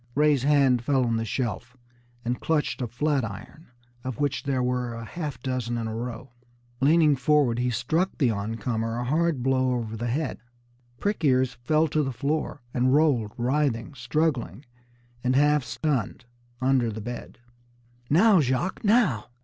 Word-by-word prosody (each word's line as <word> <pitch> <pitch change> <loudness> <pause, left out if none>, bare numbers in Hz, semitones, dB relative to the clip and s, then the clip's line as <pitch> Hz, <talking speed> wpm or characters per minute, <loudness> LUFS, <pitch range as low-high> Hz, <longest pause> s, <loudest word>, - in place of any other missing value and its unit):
Ray's 150 -2 +3
hand 135 -3 +3
fell 130 -1 +2
on 115 -1 0
the 115 - -2
shelf, 125 +2 -3 0.5
and 120 +1 -2
clutched 155 -4 0
a 125 - -1
flat 140 +3 0
iron, 115 - -8 0.4
of 130 -3 -5
which 145 -1 0
there 135 -2 -1
were 125 -1 -1
a 115 0 -7
half 150 -3 -5
dozen 125 -2 -2
in 115 - -3
a 110 - -4
row. 120 +2 -6 0.5
Leaning 150 +1 +4
forward, 135 -3 +2
he 125 0 +1
struck 140 - -1
the 130 -7 +2
oncomer 115 +2 -2
a 120 - -2
hard 155 0 0
blow 130 -1 +2
over 115 -2 -4
the 120 +2 -3
head. 145 +7 -2 0.6
Prick 205 -3 -1
ears 130 -3 +3
fell 155 +6 +1
to 155 - +1
the 135 -2 -1
floor, 145 +1 -2
and 130 +2 +3
rolled, 135 -9 +2
writhing, 125 0 0
struggling 130 - -1 0.6
and 130 0 +1
half 145 0 +4
stunned, 130 -6 -2 0.3
under 130 -2 +2
the 110 - -6
bed. 120 +2 -7 0.7
"Now, 190 +5 +5
Jacques, 135 - -1
now!" 205 - +3
130 Hz, 160 wpm, -26 LUFS, 120-150 Hz, 0.7 s, Now